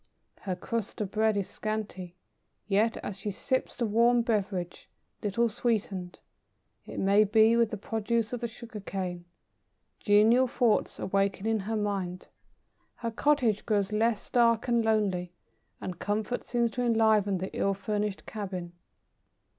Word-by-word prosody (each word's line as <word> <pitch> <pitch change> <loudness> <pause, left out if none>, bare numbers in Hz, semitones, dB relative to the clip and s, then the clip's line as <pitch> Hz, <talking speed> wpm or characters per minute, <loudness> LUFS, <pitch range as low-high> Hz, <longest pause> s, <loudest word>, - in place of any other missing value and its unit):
Her 190 -3 -3
crust 225 +3 -4
of 205 -3 -3
bread 220 -1 +2
is 195 - -1
scanty, 205 -5 -5 0.5
yet 215 +3 +2
as 200 - -5
she 205 - -3
sips 260 +6 -2
the 240 - -1
warm 235 +2 +4
beverage 195 -6 -2 0.3
little 215 +3 +1
sweetened, 205 -5 -2 0.7
it - - -8
may 200 +2 +5
be, 220 +2 +5
with 235 -2 +3
the 215 - -4
produce 225 +2 -1
of 245 - -2
the 235 - -1
sugar 230 -1 -9
cane 185 -3 -4 0.7
genial 225 +5 +5
thoughts 235 -2 +1
awaken 195 +1 0
in 225 -1 +1
her 215 +3 -2
mind; 195 -4 -3 0.7
her 230 -1 -4
cottage 240 -4 +2
grows 205 -2 0
less 220 0 +1
dark 235 -1 +3
and 235 -1 +2
lonely, 195 -5 0 0.5
and 180 -2 -6
comfort 215 +4 -2
seems 235 -1 0
to 245 - -3
enliven 220 -4 +3
the 190 +2 -5
ill 195 0 +1
furnished 205 0 -2
cabin. 185 -5 -5
215 Hz, 145 wpm, -29 LUFS, 195-230 Hz, 0.7 s, may